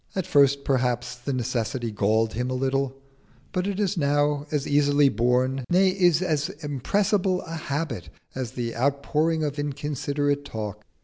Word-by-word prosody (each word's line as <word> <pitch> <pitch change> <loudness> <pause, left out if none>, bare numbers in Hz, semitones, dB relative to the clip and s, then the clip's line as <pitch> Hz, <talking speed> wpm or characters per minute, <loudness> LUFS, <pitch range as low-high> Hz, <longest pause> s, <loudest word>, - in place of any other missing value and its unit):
At 190 -3 -1
first 140 -1 +4
perhaps 125 -2 0
the 125 +3 -5
necessity 120 -1 -2
galled 110 +2 +1
him 125 +2 -2
a 130 - -1
little, 135 +1 -1 0.5
but 185 0 -1
it 200 0 -2
is 200 -2 0
now 145 0 +1
as 150 -1 -1
easily 145 0 +4
borne, 125 +2 +1
nay, 185 +2 +4
is 180 -3 +3
as 155 -2 0
irrepressible 185 - 0
a - - -10
habit 150 - -3 0.2
as 130 -2 -4
the 120 -2 -3
outpouring 150 +5 +1
of 145 -1 -2
inconsiderate 145 0 -1
talk. 105 -5 -6
140 Hz, 150 wpm, -25 LUFS, 125-155 Hz, 0.5 s, first